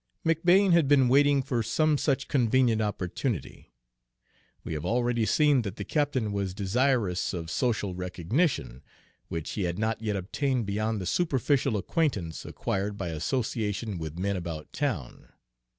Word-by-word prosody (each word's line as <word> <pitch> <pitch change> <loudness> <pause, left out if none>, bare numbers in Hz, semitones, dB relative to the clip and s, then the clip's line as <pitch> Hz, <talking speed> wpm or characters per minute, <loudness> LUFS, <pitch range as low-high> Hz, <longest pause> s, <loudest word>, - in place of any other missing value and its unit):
McBane 175 +4 +4
had 170 -4 +4
been 135 -3 +5
waiting 140 +1 +4
for 125 -4 -1
some 155 +8 +2
such 140 -1 0
convenient 120 -3 +2
opportunity. 105 - -3 0.9
We - - -5
have 75 -1 -4
already 120 -1 +1
seen 145 +3 +4
that 100 -3 -5
the - - -5
captain 140 -8 0
was 100 -2 -2
desirous 105 -2 +1
of 80 -2 -5
social 105 -6 0
recognition, 90 - -1 0.5
which 80 -2 -4
he 100 - -2
had 85 0 -2
not 110 +1 -1
yet 105 -2 -1
obtained 120 +6 -1
beyond 110 +2 -1
the - - -4
superficial 135 - +1
acquaintance 100 - -1
acquired 100 +1 -3
by 95 -4 -3
association 105 - -2
with 80 0 -6
men 100 +2 -1
about 85 -4 -6
town. 120 - -4
110 Hz, 145 wpm, -28 LUFS, 95-135 Hz, 0.9 s, been